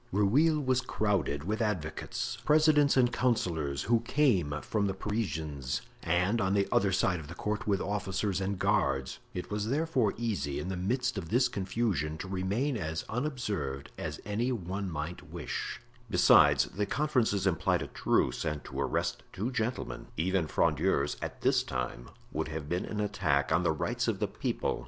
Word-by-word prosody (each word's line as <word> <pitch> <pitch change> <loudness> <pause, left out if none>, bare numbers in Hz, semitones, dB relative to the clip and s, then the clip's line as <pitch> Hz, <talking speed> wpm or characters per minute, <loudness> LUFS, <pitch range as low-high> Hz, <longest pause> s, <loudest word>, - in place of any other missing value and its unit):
Rueil 135 - +3
was 130 -2 +1
crowded 90 - 0
with 110 +6 -2
advocates, 80 - -2
presidents 150 -2 +5
and 125 -2 +4
councillors, 85 - 0
who 115 +1 +3
came 105 - +2
from 105 -2 0
the 95 - -2
Parisians, 80 - -2 0.2
and, 90 +7 +1
on 95 0 +2
the 100 -1 +3 0.3
side 90 -2 +2
of 75 - -9
the 85 - -8
court, 105 +1 -3
with 100 -2 +2
officers 100 -1 -1
and 95 +1 -1
guards; 70 -5 +1 0.2
it 90 - -5
was 105 0 -1
therefore 135 -7 +1
easy, 100 -12 -2
in 90 - -4
the 95 - -2
midst 110 +5 0
of 80 -4 -7
this 125 +4 +4
confusion, 95 - -1
to 95 - -6
remain 100 +9 -1
as 80 -4 -3
unobserved 105 - -3
as - - -5
any 110 +5 0
one 95 -3 -3
might 80 +2 -5
wish; - - -4 0.3
besides, - - +6
the 100 +1 -3
conferences 125 -10 +1
implied 90 -5 +2
a - - -6
truce, - - +1
and 75 -3 -2
to - - -4
arrest - - -1
two 110 +7 -3
gentlemen, 120 0 -3
even 90 +1 +1
Frondeurs, 70 0 +1
at - - -5
this - - +3
time, 60 -1 -4 0.2
would - - -2
have 75 -1 -5
been 90 +3 -1
an 105 - -4
attack 80 -10 +1
on 80 +2 +4
the 85 - +2
rights 80 - -1
of - - +1
the - - 0
people. - - -2
100 Hz, 170 wpm, -30 LUFS, 80-115 Hz, 0.3 s, besides